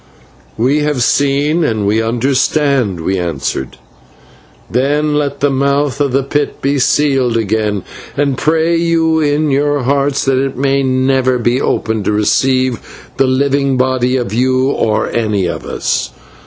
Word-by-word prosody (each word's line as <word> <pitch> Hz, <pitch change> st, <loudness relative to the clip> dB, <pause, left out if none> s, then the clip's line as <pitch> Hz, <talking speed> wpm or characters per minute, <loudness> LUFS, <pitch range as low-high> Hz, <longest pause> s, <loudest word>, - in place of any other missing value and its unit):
"We 130 Hz, +7 st, +2 dB
have 150 Hz, -4 st, 0 dB
seen, 145 Hz, +5 st, +1 dB
and 110 Hz, -8 st, -1 dB
we 105 Hz, +2 st, +1 dB
understand," 130 Hz, -, 0 dB
we 95 Hz, +3 st, -1 dB
answered. 70 Hz, -6 st, -4 dB, 0.9 s
"Then 145 Hz, +4 st, 0 dB
let 145 Hz, -2 st, -2 dB
the 145 Hz, 0 st, +2 dB
mouth 140 Hz, +1 st, 0 dB
of 140 Hz, -2 st, +1 dB
the 135 Hz, +2 st, +1 dB
pit 145 Hz, +2 st, -2 dB
be 140 Hz, +1 st, 0 dB
sealed 130 Hz, -3 st, +2 dB
again, 105 Hz, -2 st, -1 dB, 0.3 s
and 140 Hz, -1 st, +1 dB
pray 160 Hz, +4 st, +1 dB
you 165 Hz, -1 st, +1 dB
in 150 Hz, 0 st, +1 dB
your 145 Hz, 0 st, +1 dB
hearts 140 Hz, +1 st, 0 dB
that 135 Hz, 0 st, +1 dB
it 135 Hz, -2 st, -4 dB
may 140 Hz, +1 st, +1 dB
never 130 Hz, -1 st, +1 dB
be 120 Hz, +2 st, 0 dB
opened 110 Hz, -2 st, -1 dB
to -, -, +1 dB
receive 130 Hz, +4 st, -1 dB
the 135 Hz, 0 st, +3 dB
living 140 Hz, 0 st, +1 dB
body 130 Hz, 0 st, +1 dB
of 120 Hz, -5 st, -3 dB
you 130 Hz, +3 st, +1 dB
or 110 Hz, -5 st, 0 dB
of -, -, -7 dB
any 105 Hz, -5 st, 0 dB
of -, -, -4 dB
us. -, -, -2 dB
135 Hz, 155 wpm, -14 LUFS, 120-145 Hz, 0.9 s, the